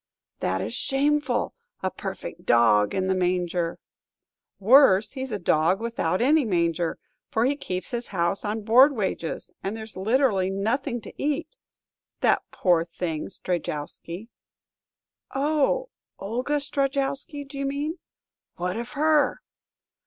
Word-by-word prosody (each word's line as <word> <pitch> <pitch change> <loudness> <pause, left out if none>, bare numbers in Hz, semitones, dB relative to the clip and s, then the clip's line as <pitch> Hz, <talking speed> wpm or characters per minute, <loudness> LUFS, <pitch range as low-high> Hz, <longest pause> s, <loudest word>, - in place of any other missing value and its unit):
"That - - -1
is - - -4
shameful; 295 +2 +1 0.3
a 190 - 0
perfect 190 -3 -7
dog 110 - +4
in 190 - 0
the 190 - +2
manger!" 180 -2 0 0.8
"Worse; 215 -2 +6
he 260 -2 -5
's 265 - -5
a 210 - -1
dog 170 +1 +2
without 225 -4 -1
any 300 +3 +4
manger! 170 -5 0 0.3
For 225 +1 +1
he 280 +3 +2
keeps 185 -9 -5
his 240 -1 -1
house 175 0 0
on 215 +1 -2
board 250 +7 +6
wages, 190 -6 -3
and 200 +3 -3
there's 220 -1 -8
literally 205 -2 +2
nothing 235 +6 -1
to - - -10
eat! 300 - -2 0.7
That - - +3
poor 175 -3 +2
thing, 165 -2 -4
Strejowsky." 175 +3 -4 1.1
"Oh, 305 - +1 0.3
Olga 250 +8 -1
Strejowsky, 280 +1 -1
do 275 0 -8
you 275 - -1
mean? 295 +5 -3 0.6
What 180 +3 -2
of 240 +3 -5
her?" 300 0 +2
220 Hz, 130 wpm, -25 LUFS, 180-275 Hz, 1.1 s, Worse